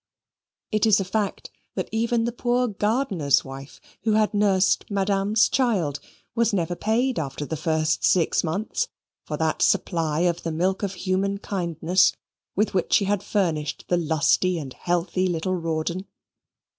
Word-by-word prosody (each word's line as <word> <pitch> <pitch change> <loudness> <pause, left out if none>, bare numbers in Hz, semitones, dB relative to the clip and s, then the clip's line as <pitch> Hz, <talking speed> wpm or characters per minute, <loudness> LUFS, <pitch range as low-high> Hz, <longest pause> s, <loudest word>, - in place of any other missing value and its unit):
It 215 0 +2
is 205 -2 +5
a 195 - -1
fact 205 +1 -2 0.2
that - - -2
even 230 +1 +1
the 235 - -1
poor 245 +1 0
gardener's 210 - +1
wife, 135 +1 -9 0.2
who 220 +1 +1
had 215 0 +2
nursed 195 -2 +2
madame's 200 +2 +2
child, 195 - 0 0.3
was 235 -1 +1
never 175 -2 0
paid 235 +6 0
after 145 -1 -4
the 160 - -3
first 155 -1 0
six 175 -3 +3
months 200 - -2 0.4
for - - -3
that - - 0
supply 160 -3 +1
of 175 -1 +1
the 165 - -3
milk 185 +4 0
of 195 -2 -2
human 190 +2 -1
kindness 180 -2 +1 0.4
with 210 +3 +1
which 185 -2 0
she 200 - +4
had 200 -1 0
furnished 165 -8 -1
the 175 - +3
lusty 170 +2 +2
and 140 -5 -6
healthy 175 +2 -1
little 175 +1 -1
Rawdon. 170 +2 -2
185 Hz, 155 wpm, -24 LUFS, 165-210 Hz, 0.4 s, is